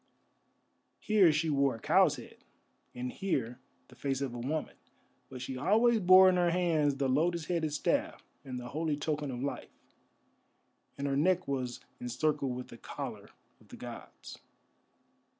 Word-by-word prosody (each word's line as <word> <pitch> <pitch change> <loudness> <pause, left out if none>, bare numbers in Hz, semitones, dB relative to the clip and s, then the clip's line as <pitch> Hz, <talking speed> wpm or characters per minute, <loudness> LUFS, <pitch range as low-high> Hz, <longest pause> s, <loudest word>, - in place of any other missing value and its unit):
Here 205 -6 +4
she 155 +1 0
wore 140 -2 +2
a - - -10
cow's - - +4
head, - - -12 0.6
and 125 0 -4
here 130 - -2 0.3
the - - -17
face 135 -2 -2
of 135 -3 -3
a 120 - -6
woman, 150 +6 -3 0.5
but 130 -1 -7
she 130 +1 -5
always 220 - +3
bore 185 0 +8
in 185 -1 +4
her 175 -1 +3
hands 165 -5 +1
the 135 0 0
lotus 160 +5 +1
headed 165 -3 -1
staff 145 - -1 0.2
and 130 -2 -6
the 120 0 -8
holy 155 0 -1
token 150 -1 -2
of 125 0 -4
life, 140 - -5 1.2
and 140 - -3
her 140 -1 0
neck 180 +5 +2
was 130 -3 -3 0.2
encircled 135 +1 -1
with 125 0 -7
the - - -11
collar - - -7 0.3
of - - -22
the - - -12
gods. - - -10
145 Hz, 160 wpm, -31 LUFS, 130-170 Hz, 1.2 s, bore